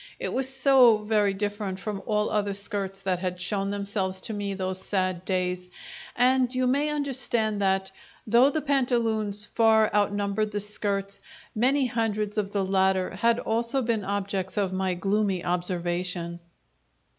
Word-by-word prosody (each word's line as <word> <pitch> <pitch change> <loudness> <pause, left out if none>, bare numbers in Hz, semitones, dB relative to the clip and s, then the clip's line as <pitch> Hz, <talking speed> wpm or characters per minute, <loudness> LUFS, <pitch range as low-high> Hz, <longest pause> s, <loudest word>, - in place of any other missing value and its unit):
It - - -3
was 265 0 -1
so 265 -4 +5
very 210 -2 +2
different 205 -1 -3
from 205 -1 -4
all 210 -1 +1
other 205 -2 0
skirts 195 -1 -4
that 185 -2 -1
had 180 -1 -3
shown 195 +2 -2
themselves 200 -2 -2
to 220 - -5
me 200 -1 -3
those 185 0 -3
sad 185 -2 -1
days, 180 -1 -1 0.5
and 250 0 +3
you 255 0 +1
may 280 +4 +2
understand 245 -7 -1
that, 190 0 +1 0.3
though 235 +5 +5
the 310 +2 -1
pantaloons 230 -7 0
far 220 -1 +3
outnumbered 205 +1 0
the 205 - 0
skirts, 200 -1 -2 0.3
many 260 +4 +2
hundreds 215 -3 -1
of 200 -1 -2
the 200 -2 0
latter 190 -1 +2
had 230 +5 +2
also 235 +3 -1
been 225 -3 0
objects 195 0 -3
of 195 -2 0
my 185 -1 0
gloomy 195 -1 0
observation. 175 -1 -2
205 Hz, 150 wpm, -26 LUFS, 190-225 Hz, 0.5 s, so